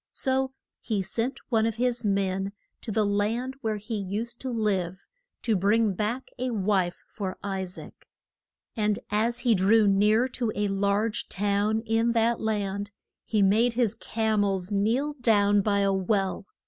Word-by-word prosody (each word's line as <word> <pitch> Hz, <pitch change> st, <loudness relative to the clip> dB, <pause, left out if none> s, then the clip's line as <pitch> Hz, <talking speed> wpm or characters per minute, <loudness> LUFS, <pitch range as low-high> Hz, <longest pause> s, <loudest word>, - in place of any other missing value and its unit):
So 265 Hz, 0 st, 0 dB, 0.3 s
he 210 Hz, -4 st, -2 dB
sent 235 Hz, +7 st, -3 dB
one 225 Hz, -3 st, +3 dB
of 225 Hz, -, -2 dB
his 245 Hz, 0 st, 0 dB
men 195 Hz, -1 st, 0 dB, 0.3 s
to -, -, -8 dB
the 215 Hz, 0 st, +1 dB
land 225 Hz, +6 st, -1 dB
where 220 Hz, -2 st, -1 dB
he 215 Hz, +2 st, -5 dB
used 210 Hz, +5 st, -4 dB
to 265 Hz, -, -3 dB
live 195 Hz, -6 st, -1 dB, 0.4 s
to 225 Hz, -, +2 dB
bring 205 Hz, +2 st, +2 dB
back 220 Hz, +7 st, -3 dB
a 255 Hz, +1 st, -1 dB
wife 195 Hz, -5 st, 0 dB
for 190 Hz, -3 st, -5 dB
I 195 Hz, -1 st, -2 dB
saac. 180 Hz, -, -9 dB, 0.8 s
And 210 Hz, -3 st, +1 dB
as 230 Hz, +3 st, +1 dB
he 240 Hz, -, +5 dB
drew 210 Hz, +3 st, +4 dB
near 210 Hz, +5 st, +4 dB
to 240 Hz, -3 st, -2 dB
a 205 Hz, 0 st, 0 dB
large 200 Hz, +3 st, 0 dB
town 205 Hz, +2 st, 0 dB
in 225 Hz, +1 st, +1 dB
that 230 Hz, 0 st, +2 dB
land 205 Hz, -2 st, -2 dB, 0.4 s
he 215 Hz, -3 st, +2 dB
made 225 Hz, +5 st, +3 dB
his 235 Hz, -4 st, +1 dB
cam 220 Hz, -2 st, 0 dB
els 195 Hz, -1 st, -1 dB
kneel 230 Hz, +9 st, +1 dB
down 205 Hz, -3 st, +4 dB
by 200 Hz, 0 st, +1 dB
a 195 Hz, 0 st, +2 dB
well. 195 Hz, 0 st, 0 dB
210 Hz, 160 wpm, -27 LUFS, 200-230 Hz, 0.8 s, he